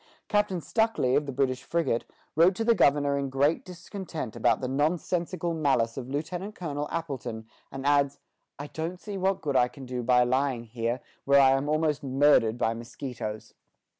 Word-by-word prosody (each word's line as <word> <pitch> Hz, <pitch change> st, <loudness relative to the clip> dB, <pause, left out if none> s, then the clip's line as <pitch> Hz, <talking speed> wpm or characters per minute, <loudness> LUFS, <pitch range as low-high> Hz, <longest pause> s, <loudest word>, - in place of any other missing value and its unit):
Captain 205 Hz, -3 st, +1 dB
Stuckley, 220 Hz, -, +1 dB
of 145 Hz, -, +1 dB
the -, -, -2 dB
British 130 Hz, -1 st, 0 dB
frigate, 165 Hz, -8 st, -1 dB, 0.3 s
wrote 170 Hz, +4 st, +5 dB
to 225 Hz, -, -1 dB
the 235 Hz, +1 st, +5 dB
governor 145 Hz, -6 st, +3 dB
in 140 Hz, -1 st, -2 dB
great 140 Hz, +4 st, +1 dB
discontent 180 Hz, -, -7 dB
about -, -, +2 dB
the 130 Hz, -, -3 dB
"nonsensical 170 Hz, +5 st, -1 dB
malice" 135 Hz, -8 st, +1 dB
of 130 Hz, -2 st, -6 dB
Lieutenant 170 Hz, +8 st, -4 dB
Colonel 150 Hz, -4 st, -4 dB
Appleton, 125 Hz, -8 st, -4 dB, 0.3 s
and 135 Hz, 0 st, -6 dB
adds, 140 Hz, -1 st, +3 dB, 0.4 s
"I 145 Hz, -, -6 dB
don't 165 Hz, +4 st, -5 dB
see 205 Hz, 0 st, -7 dB
what 190 Hz, 0 st, 0 dB
good 145 Hz, -3 st, -2 dB
I 125 Hz, -, +5 dB
can 135 Hz, +1 st, -11 dB
do 125 Hz, 0 st, -4 dB
by 125 Hz, +1 st, +4 dB
lying 130 Hz, -1 st, 0 dB
here, 115 Hz, +2 st, -3 dB, 0.2 s
where 140 Hz, 0 st, +6 dB
I 135 Hz, -1 st, +6 dB
am 135 Hz, +2 st, +1 dB
almost 155 Hz, -1 st, +1 dB
murdered 135 Hz, -4 st, +3 dB
by 115 Hz, -1 st, +1 dB
mosquitoes." 115 Hz, -2 st, -6 dB
140 Hz, 175 wpm, -27 LUFS, 130-165 Hz, 0.4 s, where